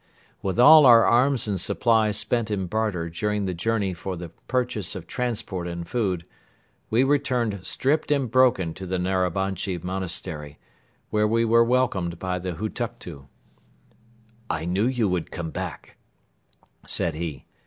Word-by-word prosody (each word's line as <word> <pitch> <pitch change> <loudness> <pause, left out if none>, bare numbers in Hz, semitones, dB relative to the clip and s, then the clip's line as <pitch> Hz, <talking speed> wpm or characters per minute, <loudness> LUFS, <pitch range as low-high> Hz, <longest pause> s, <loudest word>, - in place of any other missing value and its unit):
With 95 +1 -2
all 150 +2 +9
our 115 -2 +8
arms 125 +1 +3
and 100 -4 -1
supplies 110 -1 +2
spent 115 0 +1
in 100 -3 -1
barter 100 -4 -1
during 105 +4 -2
the 95 - -2
journey 100 +1 -1
for 90 +2 -5
the 85 0 -7 0.2
purchase 125 -1 -1
of - - -7
transport 105 -7 -3
and 85 -1 -6
food, 95 -8 -1 0.6
we 115 +4 +3
returned 130 -7 0
stripped 150 +8 0
and 135 -6 +1
broken 120 -10 +3
to 95 +2 -8
the 95 +1 -1
Narabanchi 95 0 -1
Monastery, 85 -5 -4 0.5
where 105 0 +2
we 115 +1 +2
were 115 +1 +5
welcomed 115 -9 0
by 90 0 -3
the 90 0 -4
Hutuktu. 105 - -6 1.2
"I 80 0 -2
knew 95 +6 +1
you 125 -4 +1
would 90 -3 -2
come 80 -2 -5
back," 90 -3 -7 0.9
said 85 - -1
he. 80 -2 -5
100 Hz, 145 wpm, -24 LUFS, 90-115 Hz, 1.2 s, all